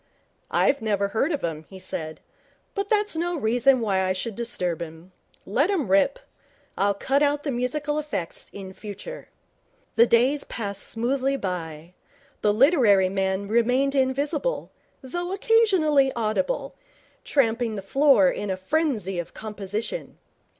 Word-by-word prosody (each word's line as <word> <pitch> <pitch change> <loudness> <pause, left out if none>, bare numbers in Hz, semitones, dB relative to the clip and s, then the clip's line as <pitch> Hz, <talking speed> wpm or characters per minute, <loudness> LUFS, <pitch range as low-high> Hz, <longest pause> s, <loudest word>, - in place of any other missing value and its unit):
'I 280 - +3
never 200 -2 0
heard 225 +10 0
of 295 - -2
him,' 160 -2 -3
he 190 - -10
said, 160 -4 -5 0.5
'but 400 0 -3
that's 420 -4 +1
no 345 +1 -1
reason 245 +2 +3
why 195 -4 +1
I 185 0 +1
should 205 +3 -4
disturb 180 -8 -2
him. 165 +2 -9 0.3
Let 275 - +1
him 310 - 0
rip. 195 - +4 0.6
I'll 200 0 +1
cut 270 +7 +1
out 290 0 +2
the 285 - -1
musical 290 +5 -1
effects - - -4
in 190 -1 -8
future.' 215 - -9 0.7
The 235 - +7
days 260 +5 +3
passed 200 -3 -4
smoothly 260 +4 0
by. 170 - -5 0.5
The 210 - +3
literary 215 - +4
man 190 +1 -1
remained 250 +5 +2
invisible, 285 - 0 0.3
though 350 +7 -4
occasionally 380 -11 +3
audible, 230 - -1 0.5
tramping 230 -4 +1
the 195 - -5
floor 275 +6 +4
in 210 -5 -1
the 190 -1 -2
frenzy 215 - -1
of 175 - -7
composition. 215 - -5
235 Hz, 140 wpm, -25 LUFS, 195-290 Hz, 0.7 s, The